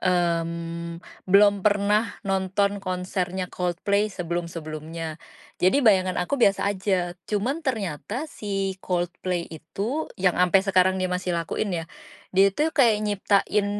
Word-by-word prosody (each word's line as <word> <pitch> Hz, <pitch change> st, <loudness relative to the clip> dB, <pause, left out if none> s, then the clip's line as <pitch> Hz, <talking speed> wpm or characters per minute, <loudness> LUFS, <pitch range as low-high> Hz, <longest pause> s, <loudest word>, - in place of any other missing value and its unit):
mmm, 170 Hz, -1 st, -1 dB, 0.3 s
belum 200 Hz, +1 st, +6 dB
pernah 205 Hz, +1 st, +2 dB
nonton 195 Hz, +1 st, 0 dB
konsernya 185 Hz, 0 st, -3 dB
Coldplay 195 Hz, +4 st, 0 dB
sebelum-sebelumnya, 165 Hz, -3 st, -5 dB, 0.4 s
jadi 185 Hz, +8 st, +4 dB
bayangan 185 Hz, -4 st, +4 dB
aku 280 Hz, +11 st, -2 dB
biasa 200 Hz, -3 st, +3 dB
aja 190 Hz, -3 st, -1 dB, 0.2 s
cuman 240 Hz, +10 st, -1 dB
ternyata 215 Hz, -, -2 dB
si 195 Hz, -2 st, -3 dB
Coldplay 175 Hz, 0 st, -2 dB
itu 200 Hz, -, -4 dB
yang 185 Hz, -1 st, +1 dB
ampe 180 Hz, +2 st, +4 dB
sekarang 185 Hz, -1 st, +3 dB
dia 185 Hz, -, -1 dB
masih 180 Hz, -1 st, -1 dB
lakuin 170 Hz, +5 st, -2 dB
ya, -, -, -8 dB, 0.5 s
dia 195 Hz, +1 st, +6 dB
itu 310 Hz, +6 st, +1 dB
kayak 235 Hz, -8 st, +4 dB
nyiptain, 205 Hz, 0 st, +1 dB
190 Hz, 120 wpm, -25 LUFS, 175-205 Hz, 0.5 s, belum